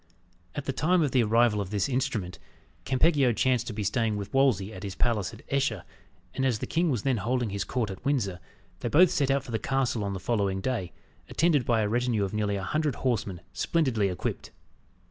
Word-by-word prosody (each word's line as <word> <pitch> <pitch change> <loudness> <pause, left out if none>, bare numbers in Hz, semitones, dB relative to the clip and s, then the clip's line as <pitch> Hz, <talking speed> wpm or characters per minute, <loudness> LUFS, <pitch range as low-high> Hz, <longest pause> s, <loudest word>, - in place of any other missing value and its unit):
At 145 - -4
the 135 - -1
time 170 +5 +2
of 145 - 0
the 130 - +4
arrival 115 -1 +3
of 95 - -5
this 105 +3 0
instrument, 115 -8 -2 0.5
Campeggio 135 -2 +3
chanced 125 0 +1
to 115 - -4
be 105 0 -3
staying 105 +1 0
with 100 -1 -6
Wolsey 115 -7 +2
at 95 - -8
his 100 -2 -5
palace 110 -5 0
at 110 - -13
Esher, 135 -9 0 0.5
and 135 - -2
as 130 -4 +2
the - - -4
king 170 +1 +1
was 125 -8 -1
then 130 -3 +1
holding 120 +1 -1
his 100 0 -2
court 120 -6 -2
at 95 - -9
Windsor, 115 -11 0 0.4
they 120 - -2
both 170 +6 +6
set 140 -2 +1
out 135 0 +2
for 125 - -9
the 110 - -1
castle 130 -5 0
on 100 -1 -2
the 95 - -4
following 100 -1 0
day, 95 -4 -2 0.4
attended 155 -6 +2
by 115 -2 +2
a 105 - +1
retinue 120 -1 +1
of 95 - -3
nearly 105 -1 0
a 95 - -3
hundred 150 +3 0
horsemen, 105 -8 -2
splendidly 130 -11 +1
equipped. 90 - -4
120 Hz, 215 wpm, -28 LUFS, 100-135 Hz, 0.5 s, both